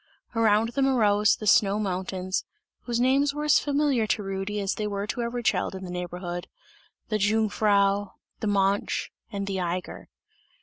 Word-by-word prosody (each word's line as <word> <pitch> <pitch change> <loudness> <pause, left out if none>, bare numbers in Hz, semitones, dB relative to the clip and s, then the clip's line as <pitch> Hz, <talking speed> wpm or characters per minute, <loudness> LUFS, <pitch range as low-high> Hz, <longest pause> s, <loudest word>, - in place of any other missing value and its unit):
Around 225 0 +3
them 270 +3 +1
arose 210 -5 +3
the 215 - -8
snow 200 0 +4
mountains, 185 -2 -2 0.4
whose 240 -1 -1
names 275 +3 +2
were 295 - -3
as 300 -1 +5
familiar 285 -6 +1
to 210 - 0
Rudy 195 +2 -3
as 195 -1 -1
they 215 - -3
were 200 -1 -3
to 240 - -3
every 235 +1 -3
child 190 -2 0
in 190 - -7
the 180 - -6
neighbourhood: 175 0 -5 0.6
"the 215 -1 0
Jungfrau," 205 -1 +2 0.3
"the 215 - -2
Mönch," 200 0 +1 0.2
and 200 -1 -3
"the 195 -1 -2
Eiger." 180 0 -4
205 Hz, 165 wpm, -26 LUFS, 195-230 Hz, 0.6 s, as